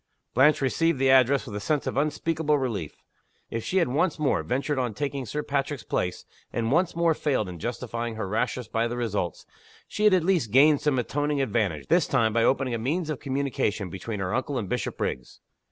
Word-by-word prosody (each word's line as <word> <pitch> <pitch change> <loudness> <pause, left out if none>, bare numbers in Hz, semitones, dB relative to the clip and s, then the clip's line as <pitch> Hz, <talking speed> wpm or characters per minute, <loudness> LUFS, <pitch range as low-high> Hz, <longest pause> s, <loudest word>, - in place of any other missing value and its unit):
Blanche 145 +4 +4
received 165 +4 +1
the 135 0 +3
address 135 +1 +4
with 105 -6 -7
a - - -2
sense 145 +8 -1
of - - -3
unspeakable 150 +1 +1
relief. 110 - -3 0.5
If 115 -1 -3
she 190 - -1
had 175 - +3
once 150 +6 +1
more 150 -3 +1
ventured 135 +3 -1
on 120 -5 -2
taking 140 -3 -3
Sir 150 +5 -3
Patrick's 140 -1 -2
place, 90 - -2 0.3
and 115 0 -1
once 170 +4 +2
more 170 -1 +3
failed 140 -9 0
in 90 -2 -8
justifying 120 0 -4
her 110 -3 -3
rashness 115 +4 -1
by 115 +1 0
the 120 +1 -4
results, 105 -8 -2 0.4
she 210 - -1
had 210 - +6
at 180 - +2
least 175 - +1
gained 145 +5 +5
some 150 -3 +1
atoning 145 +4 -1
advantage, 100 - 0
this - - +3
time, 110 -1 +2
by 115 0 +3
opening 130 0 +2
a 115 - -1
means 155 +7 -1
of 150 - -4
communication 130 - -2
between 100 +3 -5
her 95 +1 -2
uncle 130 +2 -1
and 110 -5 -3
Bishopriggs. 65 - -3
130 Hz, 200 wpm, -26 LUFS, 115-150 Hz, 0.5 s, had